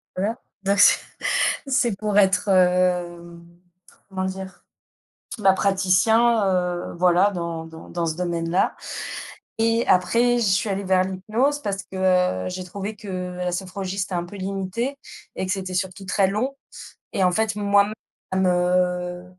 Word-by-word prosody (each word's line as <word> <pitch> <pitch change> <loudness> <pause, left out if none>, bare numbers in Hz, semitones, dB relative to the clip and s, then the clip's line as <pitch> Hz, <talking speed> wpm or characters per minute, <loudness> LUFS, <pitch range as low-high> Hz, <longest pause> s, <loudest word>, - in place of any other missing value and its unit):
voilà. 205 +5 -1 0.3
Donc 200 +1 +1
c'est - - +7 0.7
c'est 255 -5 +1
pour 210 -1 -1
être, 195 0 +3
hem, 180 -2 +1 0.6
comment 190 -1 -3
dire? 190 -1 -7 0.8
Bah, 195 -3 +5
praticien, 200 +4 +3
heu, 180 -2 -1
voilà 180 +3 +4
dans 170 -3 -4
dans 160 0 -12
dans 170 -1 -2
ce 160 -1 -2
domaine-là 170 0 0 0.8
et 230 +1 +2
après, 235 +7 +3
je - - +1
suis 195 +2 +1
allée 195 0 -2
vers 185 -1 +3
l'hypnose. 220 +10 -1
Parce 200 -1 -3
que 180 - +1
j'ai 185 0 -5
trouvé 200 +4 -6
que 210 0 -12 0.3
la 180 0 -2
sophrologie, 190 +1 -4
c'était 190 -1 -2
un 175 - -1
peu 190 +4 -11
limité 195 +8 -3 0.4
et - - -2
que 185 - -3
c'était 190 -1 -3
surtout 190 +1 -3
très 190 +1 +2
long 230 +8 -2 0.6
et 190 - +1
en 180 - +4
fait, 220 +3 0
moi-même, 205 0 +2 0.5
heu, 180 0 0
190 Hz, 145 wpm, -23 LUFS, 180-205 Hz, 0.8 s, c'est